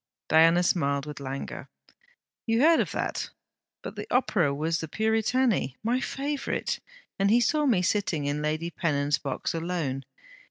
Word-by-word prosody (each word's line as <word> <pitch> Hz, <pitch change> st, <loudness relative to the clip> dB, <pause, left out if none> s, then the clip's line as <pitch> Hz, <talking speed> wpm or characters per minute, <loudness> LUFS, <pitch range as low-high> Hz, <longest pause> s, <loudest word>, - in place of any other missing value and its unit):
Diana 165 Hz, +2 st, +6 dB
smiled 140 Hz, -6 st, +1 dB
with 150 Hz, -1 st, -7 dB
languor. 135 Hz, 0 st, -6 dB, 0.8 s
'You 225 Hz, 0 st, +2 dB
heard 325 Hz, +2 st, +6 dB
of -, -, 0 dB
that? -, -, -2 dB, 0.5 s
But -, -, -7 dB
the -, -, -6 dB
Opera 205 Hz, -, +2 dB
was 160 Hz, +4 st, -1 dB
The 160 Hz, -, -4 dB
Puritani, 220 Hz, -, +1 dB
my 240 Hz, +3 st, +1 dB
favourite. 280 Hz, +1 st, -2 dB, 0.4 s
And 195 Hz, 0 st, +3 dB
he 230 Hz, +3 st, +5 dB
saw 295 Hz, +5 st, +2 dB
me 200 Hz, -8 st, +3 dB
sitting 180 Hz, -6 st, 0 dB
in 145 Hz, +1 st, -1 dB
Lady 155 Hz, +3 st, -2 dB
Pennon's 145 Hz, -4 st, 0 dB
box 135 Hz, -2 st, -3 dB
alone. 165 Hz, -5 st, -2 dB
170 Hz, 150 wpm, -27 LUFS, 145-225 Hz, 0.8 s, Diana